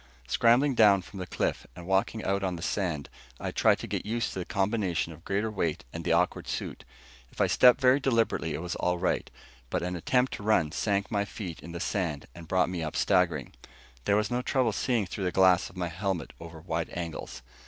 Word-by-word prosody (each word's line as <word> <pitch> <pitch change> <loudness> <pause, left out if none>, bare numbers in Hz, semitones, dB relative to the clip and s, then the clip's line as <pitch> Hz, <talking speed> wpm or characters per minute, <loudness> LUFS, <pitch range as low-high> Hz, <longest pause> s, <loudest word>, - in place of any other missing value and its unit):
Scrambling 120 - +4
down 100 -5 +5
from 95 - -10
the 90 - -5
cliff - - -2
and 85 0 -9
walking 95 +4 0
out 100 +1 0
on 95 -2 -1
the 85 - -7
sand, 85 -8 -1 0.3
I - - -3
tried - - +3
to - - -4
get - - -3
used 115 +2 -2
to - - -4
the 90 - -3
combination 95 -5 0
of 80 +2 -16
greater 105 +3 -1
weight 85 - -2
and 85 - -5
the - - 0
awkward 85 +2 +1
suit. - - -4 0.5
If - - -15
I - - +5
stepped 125 0 +6
very 130 +1 +5
deliberately 115 - +1
it 80 - -5
was 90 - -3
all 90 0 0
right, 90 +1 -1 0.4
but - - -1
an 90 0 -2
attempt 125 +9 +1
to - - -6
run 100 -7 +2
sank 100 +4 -1
my 100 -2 +1
feet 95 -5 -7
in 85 - -10
the 85 - -5
sand 85 -7 -2
and 85 -1 -11
brought 95 +2 +2
me 90 -2 -3
up 80 -1 -4
staggering. - - +1 0.5
There 100 - +3
was 105 +3 0
no 125 +1 0
trouble 125 -2 +1
seeing 115 -1 0
through 95 +2 -4
the 90 - 0
glass 95 -1 +4
of 90 - -16
my 90 -1 -2
helmet 95 +1 -3
over 85 -1 -10
wide 80 0 -3
angles. 85 -7 -6
95 Hz, 220 wpm, -28 LUFS, 85-105 Hz, 0.5 s, stepped